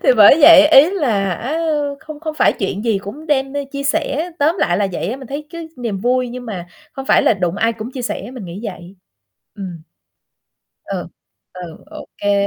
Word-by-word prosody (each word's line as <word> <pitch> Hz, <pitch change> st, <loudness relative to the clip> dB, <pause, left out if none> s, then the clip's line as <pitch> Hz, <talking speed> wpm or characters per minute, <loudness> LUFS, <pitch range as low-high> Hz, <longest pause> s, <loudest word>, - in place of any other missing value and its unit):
Thì -, -, 0 dB
bởi 215 Hz, +8 st, +8 dB
vậy 290 Hz, 0 st, +9 dB
ý 300 Hz, +2 st, +7 dB
là 220 Hz, -, 0 dB
á 270 Hz, -, -3 dB, 0.4 s
không 310 Hz, -1 st, -10 dB
không 315 Hz, -1 st, -4 dB
phải -, -, +3 dB
chuyện 200 Hz, -1 st, -3 dB
gì 220 Hz, -4 st, +1 dB
cũng 215 Hz, +11 st, -9 dB
đem 270 Hz, -3 st, 0 dB
đi 285 Hz, 0 st, -3 dB
chia 280 Hz, 0 st, -6 dB
sẻ, 305 Hz, +3 st, -1 dB
tóm 310 Hz, +5 st, +2 dB
lại 175 Hz, -, +1 dB
là 200 Hz, +1 st, +1 dB
vậy -, -, -3 dB
á. 250 Hz, -, -4 dB
Mình 270 Hz, -1 st, -10 dB
thấy 290 Hz, +4 st, -6 dB
cái 335 Hz, -1 st, -8 dB
niềm 230 Hz, -6 st, -3 dB
vui 250 Hz, +2 st, +1 dB
nhưng 245 Hz, 0 st, -8 dB
mà 185 Hz, -5 st, -6 dB, 0.3 s
không 270 Hz, -1 st, -7 dB
phải -, -, +4 dB
là -, -, +4 dB
đụng 180 Hz, -2 st, -2 dB
ai 225 Hz, +3 st, +1 dB
cũng 225 Hz, +1 st, -7 dB
chia 255 Hz, -, -5 dB
sẻ, 240 Hz, -, -4 dB
mình 250 Hz, -5 st, -8 dB
nghĩ 175 Hz, +3 st, -8 dB
vậy. 185 Hz, -2 st, -8 dB, 0.6 s
Ừm. 185 Hz, -6 st, -8 dB, 1.0 s
Ừ, -, -, -5 dB, 0.5 s
ừ, 175 Hz, -3 st, -9 dB
ô 310 Hz, +1 st, -10 dB
kê. 200 Hz, 0 st, +1 dB
245 Hz, 210 wpm, -18 LUFS, 200-290 Hz, 1.0 s, vậy